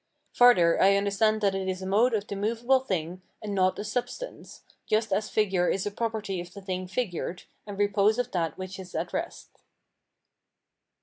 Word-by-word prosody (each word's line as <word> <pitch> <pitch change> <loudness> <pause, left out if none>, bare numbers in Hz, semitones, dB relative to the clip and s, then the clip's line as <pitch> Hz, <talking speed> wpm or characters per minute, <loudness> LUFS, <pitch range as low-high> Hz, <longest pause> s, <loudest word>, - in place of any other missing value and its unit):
Farther, 210 -9 +5
I 195 +1 +6
understand 205 +2 +1
that 200 -2 +2
it 190 -1 -2
is 185 0 -3
a - - -4
mode 220 +5 +3
of 205 -1 -2
the 200 - -5
movable 230 +6 +2
thing, 185 -7 -3 0.2
and 210 -2 -5
not 185 -1 +2
a - - -4
substance, 250 - -5 0.2
just 215 -1 +1
as 210 +2 0
figure 190 -4 +1
is 190 - -1
a 205 - -2
property 215 -4 -3
of 175 0 -10
the 200 - -8
thing 185 -1 -4
figured, 180 -4 -3 0.2
and 200 -1 -7
repose 205 +1 +3
of 245 0 -2
that 165 -3 -1
which 185 +1 -7
is 185 -1 -10
at - - -3
rest. - - -5
200 Hz, 185 wpm, -27 LUFS, 185-220 Hz, 0.2 s, I